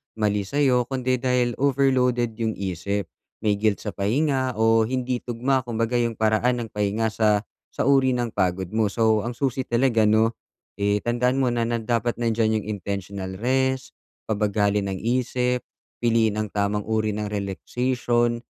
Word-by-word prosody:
mali 105 Hz, -2 st, 0 dB
sayo 130 Hz, -3 st, +2 dB
kundi 130 Hz, -1 st, -1 dB
dahil 125 Hz, -1 st, +1 dB
overloaded 130 Hz, -3 st, +2 dB
yung 110 Hz, -1 st, -1 dB
isip. 100 Hz, +1 st, -3 dB, 0.3 s
May 105 Hz, -1 st, +2 dB
guilt 105 Hz, 0 st, +1 dB
sa 105 Hz, -, -4 dB
pahinga 130 Hz, +4 st, 0 dB
o 115 Hz, 0 st, +4 dB
hindi 125 Hz, +1 st, -1 dB
tugma 125 Hz, +2 st, 0 dB
kumbaga 115 Hz, 0 st, -2 dB
yung 115 Hz, -1 st, 0 dB
paraan 110 Hz, +3 st, +2 dB
ng 115 Hz, -, -8 dB
pahinga 105 Hz, +2 st, 0 dB
sa, 110 Hz, -1 st, +2 dB, 0.3 s
sa -, -, -1 dB
uri 135 Hz, -2 st, +4 dB
ng 120 Hz, -2 st, -1 dB
pagod 95 Hz, -1 st, 0 dB
mo. 110 Hz, -2 st, +1 dB
So, 110 Hz, -1 st, +2 dB
ang 120 Hz, -, -3 dB
susi 130 Hz, +1 st, -1 dB
talaga, 120 Hz, -2 st, +2 dB
'no, 110 Hz, +2 st, +3 dB, 0.4 s
eh, 100 Hz, +1 st, +1 dB
tandaan 125 Hz, +3 st, 0 dB
mo 130 Hz, -, +2 dB
na 120 Hz, -1 st, 0 dB
na 115 Hz, 0 st, -1 dB
dapat 115 Hz, +1 st, -1 dB
nandiyan 110 Hz, -2 st, +1 dB
yung -, -, -9 dB
intentional 95 Hz, 0 st, -5 dB
rest, 130 Hz, +2 st, 0 dB, 0.3 s
pabagalin 105 Hz, -2 st, +1 dB
ang 95 Hz, -, -4 dB
isip, 125 Hz, +1 st, 0 dB, 0.4 s
piliin 115 Hz, -2 st, +3 dB
ang 105 Hz, -2 st, -3 dB
tamang 105 Hz, 0 st, 0 dB
uri 110 Hz, -1 st, 0 dB
ng 105 Hz, 0 st, -3 dB
relaxation. 120 Hz, +4 st, -1 dB
115 Hz, 160 wpm, -24 LUFS, 105-125 Hz, 0.4 s, o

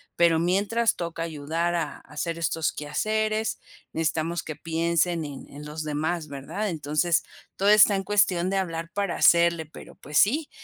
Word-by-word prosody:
pero 170 Hz, -2 st, +4 dB
mientras 200 Hz, +7 st, +1 dB
toca 170 Hz, -1 st, -4 dB
ayudar 165 Hz, +2 st, -2 dB
a 170 Hz, -, +1 dB, 0.2 s
a -, -, -17 dB
hacer 165 Hz, +3 st, -3 dB
estos 165 Hz, -1 st, 0 dB
quehaceres, 215 Hz, +8 st, -1 dB, 0.3 s
necesitamos 165 Hz, +1 st, -1 dB
que 155 Hz, -, -6 dB
piensen 165 Hz, 0 st, 0 dB
en 140 Hz, -2 st, -8 dB
en 145 Hz, +1 st, -10 dB
los 150 Hz, +1 st, -5 dB
demás, 155 Hz, +2 st, -2 dB
verdad? 145 Hz, +10 st, -4 dB
Entonces, 155 Hz, +1 st, 0 dB, 0.3 s
todo 200 Hz, +1 st, +2 dB
está 210 Hz, -1 st, +7 dB
en 195 Hz, -, -1 dB
cuestión 190 Hz, -3 st, +2 dB
de 195 Hz, -, 0 dB
hablar 165 Hz, -3 st, -3 dB
para 200 Hz, -3 st, -1 dB
hacerle, 170 Hz, -1 st, +4 dB
pero, 155 Hz, -, -13 dB
pues 150 Hz, 0 st, -4 dB
sí, 290 Hz, +9 st, +3 dB
170 Hz, 165 wpm, -26 LUFS, 155-195 Hz, 0.3 s, está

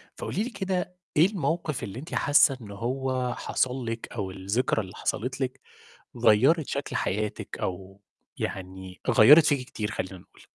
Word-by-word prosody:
فقولي 205 Hz, -, -2 dB
لي 245 Hz, -, -4 dB
كده 185 Hz, -4 st, -3 dB, 0.2 s
إيه 155 Hz, -, +7 dB
الموقف 170 Hz, -, -2 dB
اللي 100 Hz, +5 st, -6 dB
أنتِ 155 Hz, -, -7 dB
حاسة 145 Hz, -2 st, +4 dB
إن 100 Hz, -2 st, -10 dB
هو 125 Hz, +3 st, -2 dB
حصل 130 Hz, 0 st, -1 dB
لِك 115 Hz, 0 st, -4 dB
أو 100 Hz, -5 st, -3 dB
الذكرى 100 Hz, +6 st, 0 dB
اللي 95 Hz, -2 st, -10 dB
حصلت 130 Hz, +5 st, -3 dB
لِك، 130 Hz, -1 st, -3 dB, 0.6 s
غيّرت 135 Hz, +9 st, +4 dB
شكل 140 Hz, -2 st, -4 dB
حياتِك 105 Hz, -2 st, -2 dB
أو 95 Hz, +2 st, -5 dB, 0.4 s
يعني 95 Hz, 0 st, -6 dB
غيّرت 150 Hz, +8 st, +8 dB
فيكِ 140 Hz, -4 st, +1 dB
كتير 105 Hz, -4 st, -4 dB
خلينا 95 Hz, 0 st, -4 dB
نقول؟ 90 Hz, -, -20 dB
125 Hz, 155 wpm, -27 LUFS, 100-145 Hz, 0.6 s, غيّرت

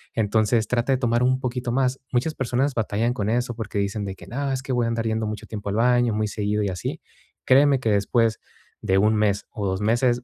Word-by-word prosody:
entonces, 110 Hz, +1 st, +1 dB
trata 120 Hz, +2 st, 0 dB
de -, -, +2 dB
tomar 120 Hz, -2 st, +1 dB
un 130 Hz, +1 st, +2 dB
poquito 125 Hz, -1 st, -3 dB
más. 130 Hz, +1 st, +1 dB
Muchas 130 Hz, +6 st, 0 dB
personas 135 Hz, +2 st, 0 dB
batallan 115 Hz, +2 st, 0 dB
con 105 Hz, -4 st, -2 dB
eso 120 Hz, +1 st, -1 dB
porque 110 Hz, -2 st, -5 dB
dicen 100 Hz, +1 st, -2 dB
de 95 Hz, -1 st, -5 dB
que: -, -, -13 dB
"No, 140 Hz, +2 st, -2 dB
es 130 Hz, 0 st, -2 dB
que 135 Hz, -, -3 dB
voy 120 Hz, -1 st, +1 dB
a -, -, 0 dB
andar 115 Hz, 0 st, -2 dB
yendo 110 Hz, 0 st, -1 dB
mucho 105 Hz, -1 st, -5 dB
tiempo 105 Hz, -2 st, -5 dB
al 100 Hz, -, -2 dB
baño, 120 Hz, +1 st, +3 dB
muy 110 Hz, 0 st, 0 dB
seguido 105 Hz, 0 st, -1 dB
y 100 Hz, -, 0 dB
así". 90 Hz, -3 st, -4 dB, 0.5 s
Créeme 135 Hz, +1 st, +5 dB
que 115 Hz, -4 st, 0 dB
después 110 Hz, +3 st, +2 dB, 0.4 s
de 95 Hz, -, +1 dB
1 105 Hz, +3 st, +4 dB
mes 105 Hz, -2 st, +1 dB
o 105 Hz, -2 st, -3 dB
2 95 Hz, +1 st, -2 dB
meses, 120 Hz, +3 st, +2 dB
115 Hz, 235 wpm, -24 LUFS, 105-125 Hz, 0.5 s, Créeme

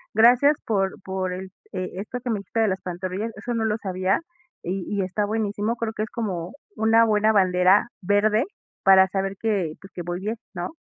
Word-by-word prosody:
Gracias 245 Hz, +6 st, +6 dB
por 195 Hz, -3 st, +1 dB
por 190 Hz, -1 st, -2 dB
el 190 Hz, +1 st, -7 dB, 0.2 s
e 185 Hz, -1 st, -3 dB
esto 215 Hz, +4 st, -5 dB
que 245 Hz, -, -2 dB
me 215 Hz, -, 0 dB
dijiste 200 Hz, +3 st, -2 dB
de 220 Hz, -, +3 dB
las 190 Hz, 0 st, -2 dB
pantorrillas, 185 Hz, +5 st, -4 dB
eso 240 Hz, +3 st, -4 dB
no 225 Hz, -1 st, 0 dB
lo 215 Hz, -1 st, +1 dB
sabía 190 Hz, -1 st, 0 dB, 0.4 s
y 185 Hz, +1 st, -2 dB
y 195 Hz, -, +1 dB
está 190 Hz, +3 st, -1 dB
buenísimo, 210 Hz, +1 st, -1 dB
creo 225 Hz, -1 st, -3 dB
que 215 Hz, -, -4 dB
es 220 Hz, -, -5 dB
como 185 Hz, -6 st, -4 dB, 0.2 s
una 225 Hz, +1 st, +4 dB
buena 215 Hz, 0 st, +3 dB
bandera 185 Hz, +1 st, +4 dB
verde 210 Hz, +4 st, +2 dB, 0.4 s
para 190 Hz, 0 st, +7 dB
saber 195 Hz, 0 st, -2 dB
que, 200 Hz, -8 st, 0 dB
pues 195 Hz, -, -13 dB
que 175 Hz, -, -5 dB
voy 175 Hz, +1 st, -4 dB
bien, 215 Hz, +4 st, -3 dB, 0.2 s
¿no? 175 Hz, 0 st, -3 dB
200 Hz, 200 wpm, -24 LUFS, 185-220 Hz, 0.4 s, para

